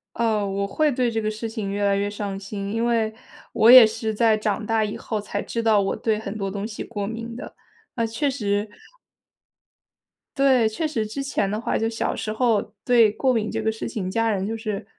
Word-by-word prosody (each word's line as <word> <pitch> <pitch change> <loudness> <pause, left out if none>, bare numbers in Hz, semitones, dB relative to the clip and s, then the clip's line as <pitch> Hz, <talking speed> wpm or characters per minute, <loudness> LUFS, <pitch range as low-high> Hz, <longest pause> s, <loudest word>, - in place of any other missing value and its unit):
呃， 220 -3 +1
我 195 +1 -1
会 305 +9 +1
对 245 -3 0
这 225 0 -1
个 215 - -1
事 220 +1 -5
情 215 -3 -4
越 205 +1 -2
来 200 0 +2
越 205 0 -1
上 205 -2 -5
心， 200 +1 -5
因 230 +1 0
为， 225 -2 +1 0.4
我 225 - +4
也 250 -2 +11
是 220 0 -2
在 220 0 +3
长 210 0 -2
大 225 0 +1
以 210 - -3
后 215 -2 -4
才 205 0 -4
知 230 - -3
道 220 -3 +4
我 195 - -1
对 220 -2 0
很 215 -1 -6
多 195 -1 -2
东 200 +1 -4
西 215 -1 -7
过 205 -3 -4
敏 230 +2 -6
的， - - -8 0.4
那 230 -2 0
确 270 +6 -1
实 205 -4 -1 1.7
······对， 260 -5 +4
确 315 +9 -3
实 225 -8 -2
之 275 +6 -4
前 210 -8 -1
的 210 +1 -2
话 - - -1
就 225 - 0
小 225 - -2
时 215 - -4
候 225 -2 +2 0.2
对 235 -4 +5
过 260 +3 +1
敏 215 -2 0
这 225 -1 -3
个 220 0 +1
事 220 - -5
情， 185 -3 -4
家 225 +1 +1
人 195 -2 -1
就 225 +2 -3
是 215 -3 -4
220 Hz, 240 characters per minute, -23 LUFS, 205-230 Hz, 1.7 s, 也